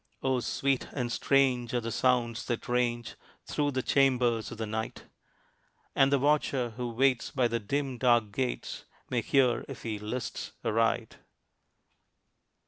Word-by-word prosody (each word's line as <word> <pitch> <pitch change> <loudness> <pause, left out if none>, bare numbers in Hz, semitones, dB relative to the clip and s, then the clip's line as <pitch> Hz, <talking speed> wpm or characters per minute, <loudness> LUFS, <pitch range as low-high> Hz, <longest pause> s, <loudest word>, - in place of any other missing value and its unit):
Oh, 130 -1 +2
sweet 135 +2 0
and 125 -3 -2
strange 125 -2 +2
are - - +3
the 115 0 -4
sounds 120 -1 +1
that 120 -2 -3
range 120 -1 0 0.3
Through 145 -1 0
the 130 -1 -1
chambers 125 -5 +2
of - - -8
the 110 - -3
night; 110 +1 -4 0.9
And 135 0 +4
the 140 - +5
watcher 135 -3 +1
who 125 +2 -4
waits 125 +1 +2
by 130 -3 +1
the 115 0 -1
dim, 135 +3 -2
dark 120 -4 +3
gates, 125 +4 -3 0.3
May 125 -2 +1
hear, 125 -1 +2
if 135 -4 -9
he 110 -2 -3
lists 110 +3 -5
aright. 115 0 +1
125 Hz, 145 wpm, -29 LUFS, 115-130 Hz, 0.9 s, the